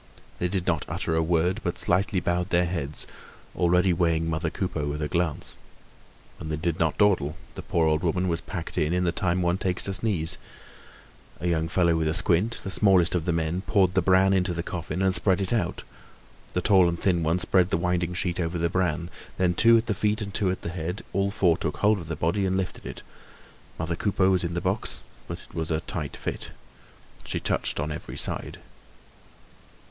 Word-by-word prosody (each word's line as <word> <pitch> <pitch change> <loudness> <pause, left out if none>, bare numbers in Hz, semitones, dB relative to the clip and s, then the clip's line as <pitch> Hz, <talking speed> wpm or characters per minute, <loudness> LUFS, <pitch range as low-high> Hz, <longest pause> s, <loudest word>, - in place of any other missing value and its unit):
They 90 - +1
did 90 0 -2
not 85 -6 0
utter 80 - -2
a 80 - +3
word, 85 +2 +1
but - - -2
slightly 95 +2 +1
bowed 90 +1 -1
their 90 -1 +3
heads, 80 -4 -3 0.5
already 90 +1 +3
weighing 85 -1 +1
mother 80 0 -1
Coupeau 80 -4 -3
with 75 +1 -3
a 75 - -1
glance. 85 -2 -1 0.8
And 80 - -6
they 80 - -1
did 80 +1 -2
not 80 -2 +1
dawdle; 85 -7 +2 0.2
the - - -7
poor 85 -1 +1
old 80 0 +2
woman 90 +1 0
was 85 -2 -1
packed 90 -4 -4
in, 75 +2 +1
in 90 0 +1
the 85 - +2
time 90 +1 0
one 90 +2 +1
takes 90 -1 0
to 100 - +1
sneeze. 90 -5 +1 1.0
A 85 - -2
young 80 -2 +1
fellow 85 0 +2
with 80 -1 0
a 80 - +1
squint, 100 +3 +1
the 95 - -3
smallest 95 -4 +4
of 85 -3 0
the 90 - +1
men, 85 +2 -1
poured 95 -2 +2
the 95 - +3
bran 95 +2 +4
into 90 -2 +1
the 85 - -2
coffin 90 0 -3
and 95 -1 +3
spread 95 +1 +2
it 95 +3 -1
out. 100 -7 -1 0.7
The 90 - 0
tall 95 -2 +5
and 85 0 -3
thin 90 -3 +2
one 80 +2 +1
spread 90 0 +2
the - - +1
winding 90 0 -1
sheet 90 -1 -1
over 85 0 -1
the 85 0 +1
bran. 85 -2 -1 0.3
Then, 90 -1 +2
two 115 +6 +6
at 115 - 0
the 110 - 0
feet 105 +2 0
and 100 -2 -5
two 100 -3 +1
at 90 - -3
the - - -3
head, 85 +3 -4
all 100 0 +1
four 90 -5 +2
took 75 - -3
hold 105 0 +3
of 85 - -8
the 80 - -3
body 85 +6 0
and 95 0 0
lifted 95 -1 -4
it. - - -8 0.7
Mother 80 +1 -2
Coupeau 95 0 +2
was 90 -2 +2
in 85 0 -3
the 85 - -1
box, 95 +4 -2 0.3
but - - -6
it - - -22
was 80 -1 -3
a 80 -1 +1
tight 75 -5 -5
fit. - - -5 0.7
She - - -3
touched - - 0
on 75 +1 -2
every 75 - -7
side. - - -2
90 Hz, 215 wpm, -26 LUFS, 80-95 Hz, 1.0 s, two